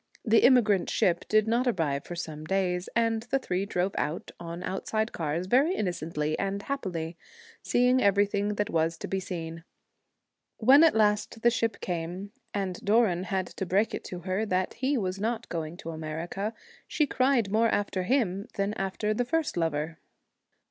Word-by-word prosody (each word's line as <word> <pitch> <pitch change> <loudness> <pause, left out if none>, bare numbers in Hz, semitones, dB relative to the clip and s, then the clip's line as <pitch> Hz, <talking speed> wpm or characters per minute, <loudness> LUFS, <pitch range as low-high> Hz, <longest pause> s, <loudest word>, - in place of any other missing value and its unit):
The 225 0 +5
emigrant 225 -7 +4
ship 175 -1 +1
did 215 0 +4
not 240 +3 +2
arrive 155 - 0
for 175 - -6
some 155 -3 -6
days; 180 +1 -1
and 230 -1 +2
the 245 +4 0
three 195 -6 -2
drove 185 -1 0
about 150 +3 -3
on 170 +1 -6
out 190 - -4
side 220 +1 0
cars 160 +2 -2
very 275 - +3
innocently 160 -5 -2
and 195 0 -1
happily, 175 -11 -4 0.4
seeing 250 +1 +3
everything 205 +1 +2
that 205 0 -1
was 165 +1 +1
to - - -6
be 195 - -1
seen. 165 -3 -6 0.9
When 270 +7 +7
at 325 - +5
last 215 +1 +1
the 235 - +6
ship 230 -1 -1
came, 180 +3 -4 0.2
and 190 -3 -3
Doran 200 -4 +3
had 190 0 -1
to 190 - -5
break 200 +5 +2
it - - -4
to 180 -1 -6
her 185 +4 -1
that 185 -3 0
he 265 +3 0
was 190 -3 -2
not 230 +2 -2
going 165 0 -4
to 165 - -6
America, 165 +7 -4 0.3
she 300 - +1
cried 255 -6 +2
more 225 +2 +3
after 200 -3 0
him 200 -2 0
than 200 0 0
after 200 +2 -1
the 245 - 0
first 320 +4 0
lover. 160 -1 -1
195 Hz, 175 wpm, -28 LUFS, 175-225 Hz, 0.9 s, When